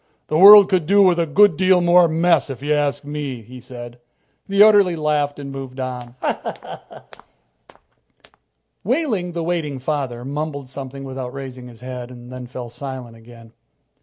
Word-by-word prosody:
"The 155 - 0
world 200 +1 +10
could 180 -5 0
do 200 +2 +5
with 180 -2 +3
a 165 - 0
good 200 +3 +4
deal 185 +2 +3
more 175 0 +5
mess, 165 -1 +1
if 135 0 -8
you 150 +1 0
ask 145 -1 -1
me," 145 -5 -6
he 125 +3 -12
said. 120 -1 -11 0.5
The 200 +1 +5
orderly 205 -5 +5
laughed 150 -2 -1
and 140 -1 -8
moved 135 -1 -8
on. 125 -2 -6 2.7
Wehling, 220 - -1
the 170 -1 -3
waiting 160 -5 -3
father, 130 -3 -4
mumbled 145 -1 -5
something 135 0 -8
without 130 -1 -7
raising 130 -2 -8
his 120 -1 -15
head. 125 -1 -7
And 120 0 -12
then 125 -1 -8
he - - -26
fell 125 -3 -8
silent 125 -2 -8
again. 115 0 -16
140 Hz, 165 wpm, -20 LUFS, 125-170 Hz, 2.7 s, world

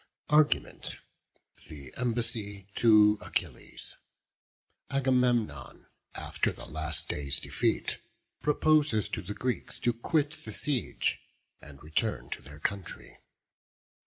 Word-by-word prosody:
ARGUMENT. 150 0 +3 0.7
THE 70 -4 -10
EMBASSY 110 -5 -2
TO 105 -2 +6
ACHILLES. - - -4 0.9
Agamemnon, 125 - +1 0.3
after - - 0
the - - -9
last 80 0 -2
day's 70 -2 -1
defeat, - - 0 0.4
proposes 150 -7 +3
to - - -3
the 105 +3 -6
Greeks 125 -1 -2
to 120 - +3
quit 150 +6 0
the 110 - -5
siege, 135 +3 0 0.4
and 70 -1 -13
return 75 - -1
to - - -4
their 75 +2 -11
country. 95 +4 -4
110 Hz, 100 wpm, -30 LUFS, 80-125 Hz, 0.9 s, TO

